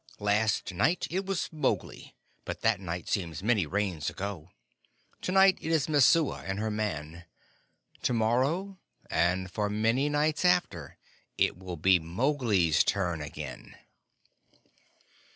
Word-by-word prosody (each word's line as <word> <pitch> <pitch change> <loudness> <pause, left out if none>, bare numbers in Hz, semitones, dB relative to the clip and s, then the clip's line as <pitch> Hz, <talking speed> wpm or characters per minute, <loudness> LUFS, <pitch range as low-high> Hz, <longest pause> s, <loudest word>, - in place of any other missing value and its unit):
"Last 105 -1 0
night 110 - +1
it 190 +2 -2
was 195 -2 -1
Mowgli 155 -2 -3 0.3
but - - -6
that - - +2
night 90 -2 -5
seems 85 -2 -3
many 105 -7 +2
Rains 95 -4 -1
ago. 95 -4 -6 0.7
To - - -2
night 190 0 +5
it 160 - -4
is 160 -3 +2
Messua 150 +1 +3
and 95 +1 -3
her 110 +1 -2
man. 85 -6 -4 0.8
To - - 0
morrow, 135 - 0 0.3
and 90 +2 +1
for 105 0 -1
very 105 +1 -3
many 120 +6 +2
nights 150 +2 0
after, 175 - +1 0.4
it - - +2
will 90 -1 -7
be 90 +3 +4
Mowgli's 100 - +1
turn 90 -5 -1
again." 75 - -8
105 Hz, 135 wpm, -29 LUFS, 90-145 Hz, 0.8 s, night